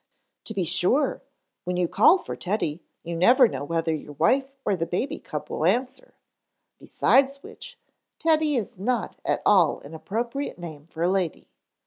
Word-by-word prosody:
"To 220 - -6
be 190 - 0
sure, 185 - +1 0.4
when 180 0 -2
you 180 -1 +1
call 210 - +5
for - - -7
Teddy, 175 -5 -2 0.2
you 170 0 -5
never 245 +9 +6
know 170 - -5
whether 165 +2 -1
your 150 -1 -6
wife 260 - +2 0.2
or 200 - +2
the 165 -2 -3
baby 180 - -2
cub 150 -3 -6
will - - -2
answer. 250 +9 -1 0.6
Besides 275 +1 +2
which, - - -11 0.4
Teddy 315 -2 +2
is 225 -3 -3
not 235 +3 -2
at - - -1
all 180 -7 +4
an 145 - -12
appropriate 235 - -4
name 155 -4 -9
for 165 0 -5
a - - +3
lady. 185 -3 -2
190 Hz, 165 wpm, -25 LUFS, 165-255 Hz, 0.6 s, never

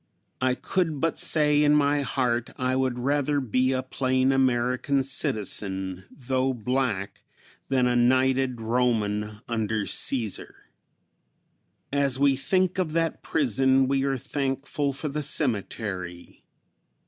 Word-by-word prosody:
I 130 0 +2
could 165 -1 -1
but 165 +1 -1
say 150 -2 +3
in 150 0 +4
my 145 0 +2
heart 125 -3 -1
I 130 0 0
would 130 -2 0
rather 145 +3 0
be 130 0 +1
a 130 0 -1
plain 130 0 +1
American 130 +1 +1
citizen, 95 -7 -2
though 130 0 -1
black, 120 -4 -2 0.5
than 130 -2 +2
a 125 0 +1
knighted 130 +1 +2
Roman 110 -2 -1
under 110 -2 -1
Cæsar. 115 -3 0 1.4
As 140 -2 +2
we 140 -1 +4
think 185 +7 0
of 165 -4 -1
that 165 0 -1
prison 130 0 +2
we 135 0 +1
are 135 -1 0
thankful 140 +2 -2
for 140 +3 -4
the 150 +1 -3
cemetery. 100 - -3
130 Hz, 125 wpm, -25 LUFS, 120-140 Hz, 1.4 s, in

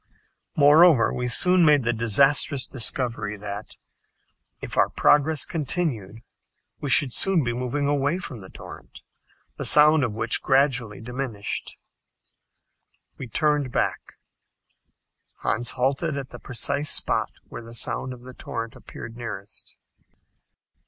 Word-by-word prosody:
Moreover, 150 -2 +5
we 125 0 -3
soon 180 +9 +4
made 150 -4 +4
the 120 0 0
disastrous 135 +5 +2
discovery 115 -4 -2
that, 105 +1 -8 0.8
if - - -7
our - - +3
progress 150 +1 +2
continued, 140 - -3 0.6
we 145 - -4
should 130 0 +4
soon 190 -5 +3
be 120 -1 -2
moving 125 +4 -3
away 145 +3 0
from 160 -10 -8
the 95 -2 -12
torrent, - - -13 0.6
the - - -3
sound 150 0 +6
of 115 -5 -2
which 115 +1 -1
gradually 130 -6 +1
diminished. 120 -3 -5 1.4
We 130 - -6
turned 150 +1 0
back. - - -3 1.3
Hans 120 0 0
halted 140 +4 -1
at 135 -2 -7
the - - -10
precise 140 +3 -1
spot - - 0 0.2
where - - -8
the 115 0 -10
sound 130 +3 -2
of 125 -1 -11
the 130 0 -11
torrent 115 -2 -7
appeared 115 0 -11
nearest. 110 -3 -8
130 Hz, 125 wpm, -24 LUFS, 115-145 Hz, 1.4 s, sound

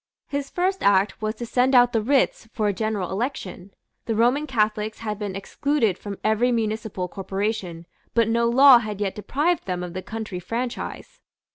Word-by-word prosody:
His 280 -1 -4
first 375 +2 -1
act 200 +1 +2
was 215 +1 -2
to 240 - -6
send 255 +3 +2
out 245 -1 +6
the 225 - +2
writs 255 -2 +1
for 215 -2 0
a 205 - +1
general 210 -2 -2
election. 200 -4 -4 0.4
The 225 - 0
Roman 250 +7 +2
Catholics 215 -3 -1
had 210 -2 -4
been 205 -3 -4
excluded 230 +1 0
from 200 0 -7
every 220 +3 +2
municipal 220 -5 -2
corporation; 195 -3 -4 0.3
but 230 -2 +4
no 235 +1 +2
law 260 +1 +8
had 210 -3 -5
yet 200 -2 -1
deprived 295 - -1
them 180 -1 -2
of 175 -1 -6
the 185 - -4
county 215 -3 -6
franchise. 250 - -5
220 Hz, 175 wpm, -24 LUFS, 200-245 Hz, 0.4 s, law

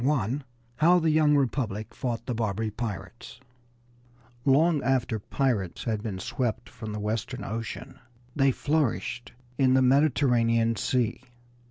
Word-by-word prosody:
IV 135 -1 0 0.3
HOW 170 +4 +5
THE 160 -2 +2
YOUNG 150 -1 +4
REPUBLIC 120 -6 -1
FOUGHT 120 -2 -3
THE 125 - -2
BARBARY 110 -1 -1
PIRATES 105 +1 -6
I 120 0 -12
Long 155 +2 +4
after 125 -4 0
pirates 105 -5 -1
had 110 -3 -1
been 105 -4 -4
swept 120 +3 -3
from 110 -1 -7
the 105 - -4
Western 110 +4 -3
Ocean 115 -1 -6 0.4
they 135 -1 +4
flourished 140 -3 -1 0.3
in 130 -1 +4
the 130 - +4
Mediterranean 125 -4 +3
Sea. 120 +2 0
120 Hz, 135 wpm, -27 LUFS, 115-135 Hz, 0.4 s, HOW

